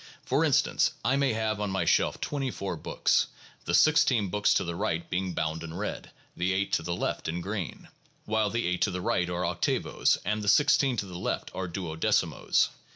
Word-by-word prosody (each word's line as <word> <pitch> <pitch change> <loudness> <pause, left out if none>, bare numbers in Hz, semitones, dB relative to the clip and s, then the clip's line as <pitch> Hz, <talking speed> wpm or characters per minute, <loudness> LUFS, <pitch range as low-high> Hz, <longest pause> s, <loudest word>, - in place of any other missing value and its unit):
For - - +2
instance - - +2
I 130 - +3
may 140 -3 +2
have 110 -1 -1
on 105 - -1
my 95 0 -1
shelf - - +2
twenty 140 -2 -2
four 100 -5 -4
books, - - +1 0.4
the - - +1
sixteen 130 -9 +4
books 105 +2 +2
to - - +2
the 85 - -3
right 85 0 -2
being 90 0 -2
bound 80 0 -2
in 80 0 -7
red, 105 +3 -4 0.3
the 90 +2 0
eight 100 +1 -1
to - - +2
the 85 +1 -3
left - - -3
in 85 +2 -2
green; 95 0 -5 0.4
while 110 -1 +1
the 115 +3 -1
eight 90 0 -1
to - - +3
the 90 -1 -3
right 90 0 0
are 90 0 -1
octavos 85 0 +1
and 105 0 0
the 105 - 0
sixteen 135 +2 +4
to 105 - -1
the 90 -2 -8
left - - -3
are 95 -1 -3
duodecimos. 85 -3 0
95 Hz, 205 wpm, -28 LUFS, 90-110 Hz, 0.4 s, sixteen